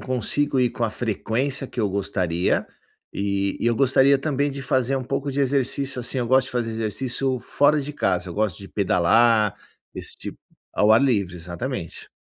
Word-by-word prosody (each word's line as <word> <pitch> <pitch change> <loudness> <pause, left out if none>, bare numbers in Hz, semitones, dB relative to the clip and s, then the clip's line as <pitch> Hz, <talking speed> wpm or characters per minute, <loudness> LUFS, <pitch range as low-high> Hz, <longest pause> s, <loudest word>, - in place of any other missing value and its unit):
consigo 130 +3 0
ir 125 -2 +2
com 120 - -2
a 110 - -1
frequência 125 +5 -2
que 125 - -12
eu 105 -3 +2
gostaria. 90 -3 0 0.5
E 100 0 -1
e - - 0
eu 115 -1 +2
gostaria 135 +1 +4
também 145 0 0
de 140 0 -6
fazer 130 0 +1
um 130 - -3
pouco 135 +2 -2
de 140 - -4
exercício 135 0 0
assim, 125 +2 -5
eu 120 - -1
gosto 130 +1 +3
de - - -8
fazer 120 -2 -1
exercício 125 +4 -2
fora 145 +5 +2
de 145 +1 -6
casa, 90 -9 -1
eu - - -7
gosto 105 -5 0
de 100 - -10
pedalar, 105 +3 +3 0.4
esse - - -2
tipo - - -8 0.3
ao 105 +1 +3
ar 115 - +5
livre, 100 -9 +1
exatamente. 90 - -6
120 Hz, 185 wpm, -23 LUFS, 100-135 Hz, 0.5 s, ar